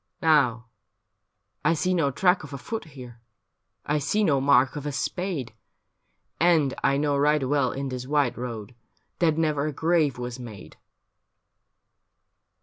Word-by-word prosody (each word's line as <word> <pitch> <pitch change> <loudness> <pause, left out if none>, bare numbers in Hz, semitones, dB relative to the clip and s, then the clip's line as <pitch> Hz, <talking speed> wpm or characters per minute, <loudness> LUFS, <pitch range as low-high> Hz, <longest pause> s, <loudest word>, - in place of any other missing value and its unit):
' - - -49
Now, 130 -7 +3 1.0
I 165 +2 +3
see 185 +4 0
no 165 -6 +2
track 180 +6 +2
of 145 -2 -10
a - - -4
foot 225 - -5
here, 125 -6 -12 0.6
I 150 +1 0
see 205 +9 0
no 140 -8 +2
mark 135 -1 +4
of 150 0 -5
a - - -2
spade, 145 - -3 0.9
And 160 -5 +3
I 140 - +3
know 145 0 +1
right 145 -1 +2
well 145 +1 +1
in 135 0 -4
this 125 0 -6
white 145 -3 +1
road 115 -2 -6 0.5
That 160 -3 +2
never 155 -2 0
a - - -2
grave 160 -3 +1
was 125 0 -6
made.' 110 -6 -10
145 Hz, 150 wpm, -25 LUFS, 130-160 Hz, 1.0 s, mark